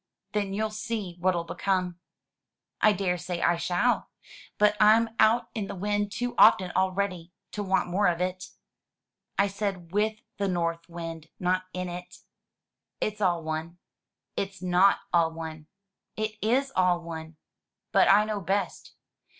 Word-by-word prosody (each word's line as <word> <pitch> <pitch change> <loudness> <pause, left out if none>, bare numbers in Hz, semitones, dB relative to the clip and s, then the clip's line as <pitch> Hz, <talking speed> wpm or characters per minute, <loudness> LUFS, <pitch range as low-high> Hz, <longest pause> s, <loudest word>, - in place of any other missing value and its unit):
Then 200 -2 -1
you'll 215 +1 -1
see 215 -4 -4
what'll 175 -1 +1
come." 180 0 -1 0.4
" - - -58
I 215 - +6
daresay 180 -3 -2
I 175 0 +2
shall. 180 +8 +1 0.5
But 210 0 +4
Tm 220 +2 +5
out 230 +2 +4
in 210 -4 -3
the 200 - -6
wind 205 +2 -1
too 245 +3 -2
often 185 -1 +6
already 185 -2 -1 0.2
to 210 - -4
want 190 -2 +1
more 200 +2 +3
of 170 -1 +1
it." 185 0 -2 0.9
"I 200 - +4
said 195 -4 -3
with 215 +2 0 0.2
the 200 - 0
North 170 -2 -2
Wind, 165 -2 -7
not 185 0 +1
in 180 0 -4
it." 180 0 -8 0.8
"It's 215 0 -2
all 175 -4 +2
one." 160 +2 -4 0.6
"It's 195 0 -3
not 180 +2 +4
all 165 -2 +4
one." 160 -1 -7 0.5
"It 215 0 -1
is 260 +6 +1
all 180 -1 +3
one." 160 -1 -7 0.6
"But - - +5
I 205 +2 +6
know 215 -2 -3
best." 195 0 -2
185 Hz, 150 wpm, -27 LUFS, 175-205 Hz, 0.9 s, I